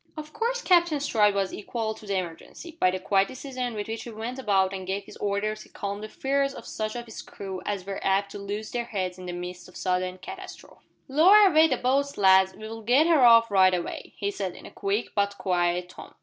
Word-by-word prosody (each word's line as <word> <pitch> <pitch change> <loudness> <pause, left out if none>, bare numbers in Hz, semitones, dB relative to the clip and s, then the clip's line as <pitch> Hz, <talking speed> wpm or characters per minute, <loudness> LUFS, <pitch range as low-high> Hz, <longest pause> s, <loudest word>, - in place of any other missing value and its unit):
Of 305 0 -8
course 485 +2 -1
Captain 345 -4 +4
Stride 210 -7 +2
was 195 -1 -1
equal 220 +1 -3
to 215 - -14
the 200 -1 0
emergency. 185 - -7
By 185 - +4
the 185 - -2
quiet 195 +1 +2
decision 255 -2 -5
with 205 -1 -4
which 225 0 -4
he - - -8
went 230 +3 -6
about 195 -5 +2
and 190 -1 -6
gave 195 +1 -2
his - - -13
orders 205 +1 -2
he - - -15
calmed 200 0 -5
the 215 - -6
fears 275 +2 -1
of - - -10
such 215 +1 -4
of 240 0 -5
his 225 - -9
crew 190 -2 -7
as 200 -3 -3
were 195 0 -5
apt 195 +1 +1
to 205 - -7
"lose 205 +2 -5
their 240 -1 -2
heads" 185 -5 -4
in 180 - -8
the - - -3
midst 180 0 -7
of 180 - -12
sudden 185 0 -1
catastrophe. 185 - -10 0.3
"Lower 365 +10 +7
away 320 -2 +5
the - - 0
boats, 275 +3 0
lads. 190 -1 +5
We'll 220 +1 -8
get 250 +8 +4
her 330 -4 +4
off 230 -2 +7
right 185 -2 +5
a 175 - -1
way," - - -8
he 200 -1 -2
said, 190 -3 -4
in - - -12
a - - -10
quick 200 +3 -2
but 200 -1 0
quiet 180 -1 0
tone. - - -12
205 Hz, 235 wpm, -26 LUFS, 190-250 Hz, 0.3 s, Lower